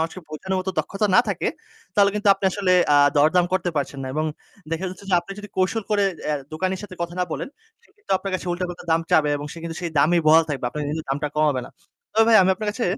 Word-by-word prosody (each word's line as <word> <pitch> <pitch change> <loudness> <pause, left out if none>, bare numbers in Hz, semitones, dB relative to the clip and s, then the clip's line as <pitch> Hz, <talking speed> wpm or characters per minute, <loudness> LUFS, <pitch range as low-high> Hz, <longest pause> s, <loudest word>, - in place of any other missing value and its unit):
মানুষকে 165 +3 -3
বোঝানোর 190 +5 -3
মতো 185 +1 -3
দক্ষতা 205 +2 0
না - - +8
থাকে - - -1 0.5
তাহলে 200 -1 +5
কিন্তু 210 0 +1
আপনি 195 - -7
আসলে 190 -1 +1 0.2
আ - - +6 0.2
দরদাম 160 +5 +4
করতে 185 -1 0
পারছেন 140 -1 -2
না 130 - -4
এবং 155 +1 0 0.5
দেখা 165 +3 -2
যাচ্ছে 185 +2 -11
যে, - - +4
আপনি 175 +3 -9
যদি 205 0 -8
কৌশল 190 +4 +1
করে 205 -1 +3 0.2
অ্যা 150 - +1 0.2
দোকানির 185 +4 -2
সাথে 205 -3 -9
কথা 170 0 -5
না - - +2
বলেন। - - -4 0.4
সে - - -27
কিন্তু 415 - -18
আপনার 195 - -5
কাছে 185 - -4
উল্টো-পাল্টা 175 0 -5
দাম 165 - +3
চাবে 150 -1 +4
এবং 145 0 -6
সে - - -10
কিন্তু 165 -1 -5
সেই 170 -2 -3
দামেই 165 +4 +4
বহাল 160 +1 +7
থাকবে। 140 -4 -3
আপনার 150 +4 -5
কিন্তু 155 +1 -4
দামটা 145 +2 -1
কমাবে 150 -4 +2
না। - - -14 0.4
তবে 225 +1 +4
ভাই 225 - +7
আমি 185 - +3
আপনার 215 +2 -4
কাছে 235 +2 -3
175 Hz, 245 wpm, -23 LUFS, 155-195 Hz, 0.5 s, না